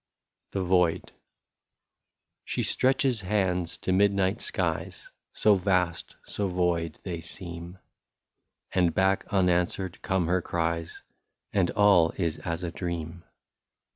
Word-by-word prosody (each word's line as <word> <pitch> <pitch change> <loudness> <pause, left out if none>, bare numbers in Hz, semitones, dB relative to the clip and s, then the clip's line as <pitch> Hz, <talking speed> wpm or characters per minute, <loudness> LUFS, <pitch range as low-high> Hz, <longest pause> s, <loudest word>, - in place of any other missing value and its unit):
*' - - -45
lOO 95 - +1
THE - - -4
VOID. 90 -2 +2 1.3
She - - -2
stretches 130 -3 +2
hands 90 -3 0
to - - -2
midnight 100 0 +2
skies - - -3 0.2
So 105 - +4
vast, 90 -3 0
so 100 - -2
void, 85 -3 0
they 85 -3 -4
seem; 85 +1 -8 0.9
And 85 -3 +2
back 95 +1 +2
unanswered 90 -1 0
come 95 -2 0
her 90 +2 +1
cries. 85 -1 -2 0.5
And 95 -3 +2
all 100 -6 +4
is 85 -4 -1
as 85 +1 -4
a 85 - -3
dream. 85 -1 -5
90 Hz, 120 wpm, -27 LUFS, 85-95 Hz, 1.3 s, So